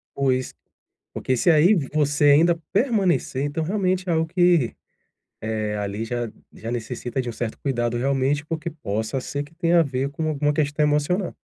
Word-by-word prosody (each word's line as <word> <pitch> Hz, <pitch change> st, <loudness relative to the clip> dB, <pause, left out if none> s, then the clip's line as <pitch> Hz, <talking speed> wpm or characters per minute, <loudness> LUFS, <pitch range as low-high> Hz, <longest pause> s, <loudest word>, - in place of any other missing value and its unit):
Pois, 130 Hz, -2 st, 0 dB, 0.6 s
porque 130 Hz, -, -1 dB
se 170 Hz, -, +4 dB
aí 165 Hz, +7 st, +5 dB, 0.2 s
você 145 Hz, -1 st, +1 dB
ainda 165 Hz, +3 st, +4 dB
permanecer, 195 Hz, -, +1 dB
então 145 Hz, +3 st, -2 dB
realmente 185 Hz, 0 st, 0 dB
é -, -, +3 dB
algo 160 Hz, 0 st, +2 dB
que, 175 Hz, -6 st, +2 dB, 0.7 s
eh, 110 Hz, -1 st, -2 dB
ali 105 Hz, +2 st, -3 dB
já 120 Hz, -1 st, -3 dB, 0.2 s
já 115 Hz, -, -7 dB
necessita 120 Hz, +2 st, -4 dB
de 125 Hz, -, -2 dB
um -, -, -3 dB
certo 115 Hz, 0 st, -4 dB
cuidado 120 Hz, -3 st, -1 dB
realmente, 135 Hz, +3 st, 0 dB
porque 165 Hz, +1 st, -3 dB
possa 110 Hz, -5 st, -3 dB
ser 140 Hz, +3 st, -4 dB
que 145 Hz, +3 st, -17 dB
tenha 170 Hz, 0 st, +3 dB
a -, -, +5 dB
ver 135 Hz, -1 st, -2 dB
com 155 Hz, +2 st, -3 dB
alguma 150 Hz, 0 st, +1 dB
questão 150 Hz, 0 st, +1 dB
emocional. 150 Hz, +6 st, 0 dB
145 Hz, 170 wpm, -23 LUFS, 125-165 Hz, 0.7 s, aí